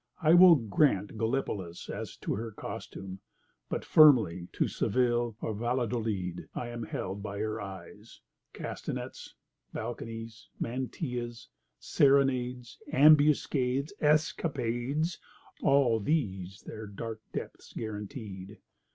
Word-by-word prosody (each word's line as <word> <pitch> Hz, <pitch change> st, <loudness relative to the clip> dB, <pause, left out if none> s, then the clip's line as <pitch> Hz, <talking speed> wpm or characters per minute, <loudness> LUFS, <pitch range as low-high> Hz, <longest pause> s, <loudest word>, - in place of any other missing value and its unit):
I 160 Hz, -2 st, +4 dB
will 175 Hz, -1 st, +9 dB
grant 110 Hz, -4 st, +1 dB
Gallipolis 110 Hz, -7 st, -2 dB
as -, -, -6 dB
to -, -, -1 dB
her 115 Hz, +3 st, -3 dB
costume, 95 Hz, -2 st, -7 dB, 0.5 s
but -, -, -3 dB
firmly 110 Hz, -, +6 dB
to -, -, +1 dB
Seville 120 Hz, -1 st, 0 dB
or 110 Hz, -, -2 dB
Valladolid 110 Hz, -6 st, -2 dB
I 120 Hz, -, -4 dB
am 120 Hz, 0 st, -6 dB
held 100 Hz, -2 st, -4 dB
by 100 Hz, -1 st, -5 dB
her 110 Hz, +1 st, -2 dB
eyes; 95 Hz, -2 st, -10 dB, 0.3 s
castanets, -, -, -6 dB, 0.4 s
balconies, 115 Hz, 0 st, -6 dB
mantillas, 120 Hz, -1 st, -4 dB, 0.3 s
serenades, 125 Hz, -3 st, +2 dB
ambuscades, 145 Hz, -1 st, +4 dB
escapades—all 140 Hz, -3 st, 0 dB
these 100 Hz, -, -2 dB
their 110 Hz, 0 st, -7 dB
dark 110 Hz, +2 st, -6 dB
depths -, -, -7 dB
guaranteed. 105 Hz, -2 st, -7 dB
120 Hz, 100 wpm, -30 LUFS, 105-135 Hz, 0.5 s, will